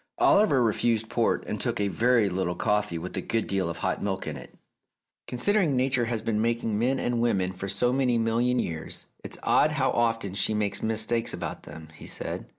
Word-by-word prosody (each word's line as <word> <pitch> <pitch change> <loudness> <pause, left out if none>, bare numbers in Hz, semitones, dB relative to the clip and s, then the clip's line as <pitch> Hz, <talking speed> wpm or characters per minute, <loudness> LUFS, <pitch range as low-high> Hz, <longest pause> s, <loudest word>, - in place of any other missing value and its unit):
Oliver 170 - +4
refused 115 0 +1
port, - - +1
and - - -4
took - - -2
a 100 - +1
very 115 +1 +3
little 90 -2 -1
coffee 105 -4 0
with 80 - -6
a - - -1
good 115 -1 -1
deal 95 -3 -1
of 85 - -5
hot - - -2
milk 95 -1 -2
in 75 - -4
it. 65 - -12 0.7
"Considering 170 - +1
Nature 130 -1 +1
has 115 -2 -2
been 110 -1 0
making 115 -2 0
men 130 +4 +1
and 120 -1 0
women 95 -6 +1
for 95 +2 -5
so 120 +6 +1
many 130 -3 +2
million 115 +2 +1
years, 80 -8 -1 0.2
it's - - -7
odd 155 - +3
how 135 -3 +1
often 115 -4 0
she 105 +2 +1
makes 105 -1 -1
mistakes 110 +1 0
about - - -6
them," 80 -1 -10
he - - -12
said. - - -4
115 Hz, 200 wpm, -27 LUFS, 100-120 Hz, 0.7 s, Oliver